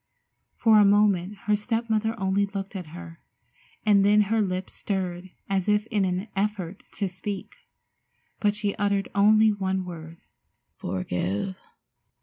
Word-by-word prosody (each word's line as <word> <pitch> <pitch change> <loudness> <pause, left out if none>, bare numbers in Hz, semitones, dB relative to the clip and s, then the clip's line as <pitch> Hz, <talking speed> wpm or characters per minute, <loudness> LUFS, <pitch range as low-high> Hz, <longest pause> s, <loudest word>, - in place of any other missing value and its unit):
For 220 -2 +5
a - - +7
moment 200 -2 +3
her 210 0 +3
step 225 +2 -2
mother 220 0 0
only 195 +1 +1
looked 195 0 -6
at 180 -4 -5
her, 170 +1 -10 0.7
and 205 -2 +5
then 210 +1 +5
her 215 +2 +1
lips 185 -2 -2
stirred 185 -2 -3 0.2
as 195 0 0
if 210 0 +2
in 205 -3 +2
an 185 +3 -2
effort 195 -2 -2
to 200 - -2
speak, 190 +2 -6 0.9
but 205 -1 +2
she 205 -1 -1
uttered 200 -1 0
only 215 +2 +5
one 190 -2 -1
word, 165 -2 -9 0.6
"Forgive?" 95 - -2
200 Hz, 140 wpm, -26 LUFS, 185-210 Hz, 0.9 s, a